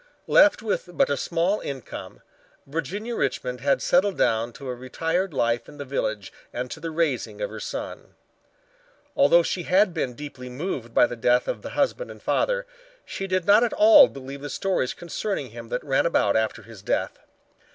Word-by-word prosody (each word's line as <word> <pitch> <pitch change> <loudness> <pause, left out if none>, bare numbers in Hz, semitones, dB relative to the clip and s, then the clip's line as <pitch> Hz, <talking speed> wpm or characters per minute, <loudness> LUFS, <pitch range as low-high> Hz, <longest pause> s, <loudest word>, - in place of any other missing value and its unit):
Left 295 -5 +5
with 205 -4 -2
but 155 - +2
a - - +2
small 170 +7 0
income, 135 -3 -8 0.4
Virginia 200 +10 -4
Richmond 125 - -2
had 140 +1 +1
settled 190 +2 +2
down 115 +1 +1
to 135 - -9
a 125 - -2
retired 165 +9 -2
life 120 -4 0
in 145 - -13
the 140 - -6
village 110 -7 -3 0.2
and 125 +1 -5
to 160 - -6
the 165 +1 -4
raising 155 -5 -1
of - - -3
her - - -7
son. - - -7 1.0
Although 275 - +5
she 180 - -2
had 185 +2 +3
been 135 -7 -2
deeply 130 -2 -8
moved 125 -3 -4
by - - +7
the 120 - -5
death 125 +2 +2
of 110 - -3
the - - -7
husband 295 - 0
and - - -10
father, - - 0 0.4
she 195 - -5
did 185 -2 0
not 210 +3 +6
at 235 - 0
all 315 -3 +8
believe 135 +1 -9
the 145 - -6
stories 180 -3 -1
concerning 175 - -4
him 115 0 -10
that 125 - -3
ran 140 +2 +2
about 100 -11 +2
after 110 0 0
his 110 -2 -13
death. - - -2
145 Hz, 185 wpm, -25 LUFS, 125-195 Hz, 1.0 s, all